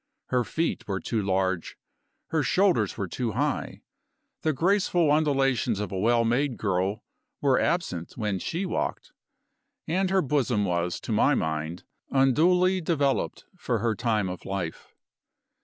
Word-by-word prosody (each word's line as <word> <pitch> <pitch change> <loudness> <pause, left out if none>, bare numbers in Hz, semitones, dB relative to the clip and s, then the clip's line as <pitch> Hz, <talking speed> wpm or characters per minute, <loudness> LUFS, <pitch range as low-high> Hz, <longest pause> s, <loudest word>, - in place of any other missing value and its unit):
Her 125 -1 +2
feet 165 +7 -2
were 95 -2 -1
too 110 +2 -2
large; 95 -2 -1 0.5
her 160 - +1
shoulders 170 - +2
were 95 - -2
too 115 +4 -3
high; - - -2 0.6
the 155 - +2
graceful 175 0 +2
undulations 135 -7 +2
of 105 -3 -3
a 95 - -2
well 115 +3 +3
made 125 +2 +1
girl 100 +1 -1 0.4
were 135 -2 +3
absent 150 - -1
when 105 -4 -1
she 175 - -3
walked; 180 - -3 0.8
and 185 +4 +1
her 190 0 +2
bosom 130 -7 +1
was, 90 -1 -1
to - - -5
my - - +3
mind, 80 +2 -2 0.3
unduly 180 +8 +3
developed 145 -5 0
for 125 -9 -1
her 110 +1 0
time 110 -2 0
of 90 0 -6
life. 95 -4 -5
120 Hz, 140 wpm, -27 LUFS, 95-155 Hz, 0.8 s, well